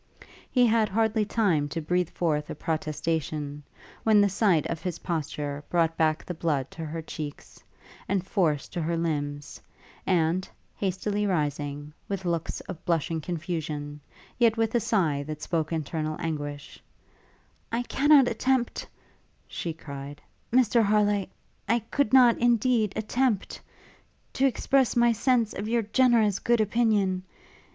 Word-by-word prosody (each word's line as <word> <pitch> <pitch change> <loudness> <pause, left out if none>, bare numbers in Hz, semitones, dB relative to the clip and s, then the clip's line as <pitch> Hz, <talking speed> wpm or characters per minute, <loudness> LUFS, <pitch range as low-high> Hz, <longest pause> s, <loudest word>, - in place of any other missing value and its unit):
He 250 -2 +4
had 225 -2 +3
hardly 220 +1 +1
time 180 -10 +1
to 165 - -3
breathe 175 +2 0
forth 150 -4 -1
a - - -5
protestation, 155 -2 -3 0.4
when 215 -2 +4
the 205 0 +4
sight 190 -5 +2
of 165 - -4
his 180 -3 -3
posture 145 -3 -4
brought 165 -2 +2
back 155 -1 +1
the 180 - -4
blood 150 -5 -1
to 165 - -7
her 160 +1 -5
cheeks, 150 -2 -8 0.5
and 190 -1 0
force 165 -8 0
to 175 - -4
her 165 +1 -1
limbs; 145 -3 -3 0.5
and, 175 0 +1 0.3
hastily 205 +2 -1
rising, 145 -3 -2 0.2
with 195 -2 -3
looks 170 -2 -2
of 165 - -9
blushing 165 -2 0
confusion, 155 -3 -4 0.4
yet 230 -2 +4
with 225 -1 +1
a 240 - +3
sigh 170 -10 +1
that 150 +1 -6
spoke 160 -3 -1
internal 155 -1 -2
anguish, 145 -3 -5 0.9
'I 235 +2 0
cannot 280 +1 +5
attempt,' 245 +1 0 0.6
she 170 - -4
cried, 140 -2 -8 0.3
'Mr 240 -1 +4
Harleigh, 205 -2 +2 0.4
I 230 - +4
could 230 +1 -1
not, 250 -3 +6
indeed, 235 -2 +2
attempt 220 -1 -1 0.7
to 270 - +3
express 265 0 +1
my 235 0 +5
sense 235 -1 +1
of 205 - -4
your 230 0 +1
generous 220 -3 +3
good 235 0 +2
opinion! 210 -4 +2
180 Hz, 140 wpm, -27 LUFS, 155-225 Hz, 0.9 s, not